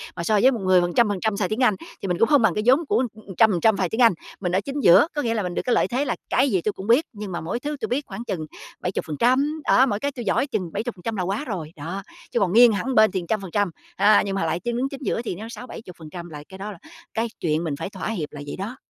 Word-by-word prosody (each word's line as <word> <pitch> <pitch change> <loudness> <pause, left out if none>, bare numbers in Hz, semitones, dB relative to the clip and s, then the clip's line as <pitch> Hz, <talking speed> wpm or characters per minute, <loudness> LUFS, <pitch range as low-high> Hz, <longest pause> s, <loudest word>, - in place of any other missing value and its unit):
mà 170 - -4
so 210 +3 +2
với 260 - +6
một 240 - -3
người 185 -2 +4
phần 175 0 -1
trăm 235 +3 +4
phần 200 -2 -2
trăm 220 -2 0
xài 185 -3 0
tiếng 215 - -2
Anh, 215 -5 +4 0.3
thì - - -3
mình 180 -1 0
cũng 230 - +5
không 290 -3 +5
bằng 225 - +3
cái 210 - -1
vốn 270 +7 +4
của, 260 - +1
ừm, 205 -3 -11
trăm 220 -1 +6
phần 180 - 0
trăm 220 -2 +4
xài 185 -3 0
tiếng 225 - -1
Anh. 230 -4 +7 0.3
Mình 180 -3 -2
ở 185 +2 +2
chính 275 +5 -4
giữa, 175 - +7
có 295 - 0
nghĩa 230 -4 0
là 215 -3 -1
mình 180 -1 -3
được - - 0
cái 245 - +2
lợi - - +2
thế 260 +4 -1
là 245 - -1
cái 265 +1 +2
gì 190 -4 +2
tôi 210 - -1
cũng 190 - -8
biết 245 +7 +4
nhưng 210 -2 -7
mà 170 - -4
mỗi 165 +9 -3
thứ 295 +3 -3
tôi - - -1
biết 275 +4 -1
khoảng 210 +3 -7
chừng 190 -9 -4 0.4
70%, 255 - 0
đó, 260 - +6
mỗi 205 -6 -1
cái 285 +5 -1
tôi 245 -4 -7
giỏi 260 - +1
chừng 205 - -3
70% 220 0 -4
là 185 - -1
quá 200 +10 -2
rồi, 175 -9 -5
đó. 170 +7 -6 0.3
Chứ - - +1
còn 185 -2 +1
nghiêng 240 +1 +8
hẳn 255 +6 -2
bên 215 0 +6
thì 185 -3 -2
trăm 215 -2 0
phần 190 -3 -8
trăm, 205 -2 +1 0.2
a, 205 +2 +5
nhưng 195 -1 -2
mà 195 - 0
lại 165 +1 -1
chứng 240 +5 -2
chính 275 0 -8
giữa 230 - -1
thì 230 - -4
nó 220 +5 -8
60%-70% 180 -7 -9
là 150 -2 -9
cái 190 - -10
đó 205 +2 -6
là 195 - -10 0.4
cái 225 +1 0
chuyện 160 -1 0
mình 155 -4 -2
phải 165 +5 -5
thỏa 195 +1 -5
hiệp 170 -9 -3
là 145 - -8
vậy - - -5
đó. 210 +7 -5
210 Hz, 310 wpm, -23 LUFS, 180-240 Hz, 0.4 s, nghiêng